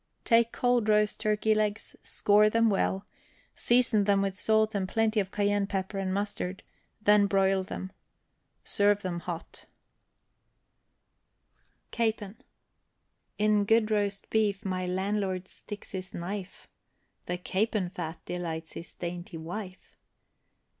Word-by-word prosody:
Take 230 -1 +4
cold 245 -3 +1
roast 210 -1 +3
turkey 215 0 +2
legs, 215 0 -1
score 210 +1 +3
them 230 0 +3
well, 195 0 0 0.5
season 240 -4 +3
them 200 -1 +3
with 195 -1 -2
salt 220 +1 +2
and 190 -2 -1
plenty 225 0 +1
of 195 -2 -1
cayenne 205 0 +1
pepper 195 0 -3
and 190 -1 -1
mustard, 195 -1 -3 0.4
then 210 -1 +5
broil 195 -1 +2
them. 190 0 -6 0.7
Serve 205 0 +2
them 175 -2 -2
hot. 170 0 -7 2.3
CAPON. 220 -2 -1 1.0
In 210 0 +3
good 225 +1 +3
roast 205 -2 0
beef 210 -1 +1
my 185 -1 -2
landlord 190 0 -1
sticks 205 +1 -10
his 185 -1 -6
knife, 190 +2 -6 0.6
The 180 - -2
capon 190 0 -1
fat 165 -3 -6
delights 165 -2 -4
his 170 - -9
dainty 175 0 -6
wife. 185 +4 -8
200 Hz, 120 wpm, -29 LUFS, 185-215 Hz, 2.3 s, then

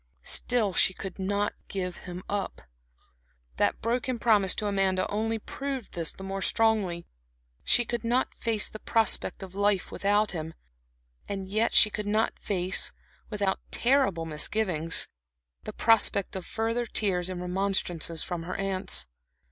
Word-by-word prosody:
Still 225 -6 +1
she 185 - +3
could 195 -1 -7
not 200 +2 0
give 180 -2 -4
him 180 +1 -7
up. 200 - -3 0.9
That - - +1
broken 245 +2 0
promise 210 -5 +3
to 215 - -2
Amanda 195 -2 +1
only 225 +2 0
proved 270 +2 -5
this 165 -2 0
the 190 - -11
more 195 0 -4
strongly. 210 -6 +1 0.6
She 240 - +3
could 240 0 -3
not 245 +3 +1
face 225 -3 -1
the 215 - -9
prospect 225 -3 +1
of 190 -1 -9
life 200 -1 +1
without 205 +1 +1
him. 160 -2 -5 0.7
And 195 -1 -4
yet 215 +4 +1
she 215 - +8
could 210 -1 -4
not 215 +2 +1
face 185 -2 0 0.4
without 200 -2 -1
terrible 240 -10 +2
misgivings 165 +1 +1 0.6
the - - -4
prospect 215 -4 +3
of 185 -2 -5
further 230 +2 -1
tears 185 -5 +2
and 185 -1 -4
remonstrances 180 -3 -1
from 175 -2 -4
her 175 +2 -5
aunts. 195 - 0
200 Hz, 145 wpm, -28 LUFS, 185-220 Hz, 0.9 s, she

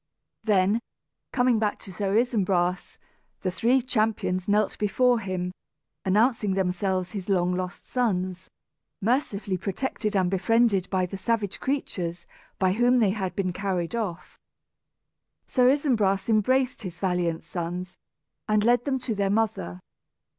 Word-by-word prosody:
Then, 205 0 +3 0.5
coming 245 -3 +3
back 210 -1 0
to 190 - -7
Sir 200 +3 0
Isumbras, 185 -7 +1 0.5
the 185 - 0
three 240 +7 +2
champions 215 -6 0
knelt 210 0 +2
before 240 +4 +3
him, 185 -3 -3 0.5
announcing 210 0 +2
themselves 185 -1 0
his 200 -2 -6
long 180 -2 +2
lost 180 -1 -5
sons, 185 -7 -1 0.5
mercifully 210 -4 0
protected 210 +2 -2
and 185 -2 +2
befriended 195 0 +2
by 185 -2 +1
the 195 +2 -6
savage 205 0 -1
creatures 180 -11 -3 0.3
by 185 -1 +2
whom 245 +4 +3
they 215 -5 +4
had 190 -3 -3
been 185 -2 -1
carried 185 -2 -2
off. 200 -7 -4 1.1
Sir 250 -1 +3
Isumbras 230 -9 +2
embraced 255 +4 +2
his 180 -5 -6
valiant 175 -3 -1
sons, 175 +1 -5 0.5
and 215 -1 +3
led 240 +1 +3
them 275 -2 +1
to 250 -2 -3
their 200 -1 0
mother. 190 - -1
200 Hz, 130 wpm, -26 LUFS, 185-230 Hz, 1.1 s, they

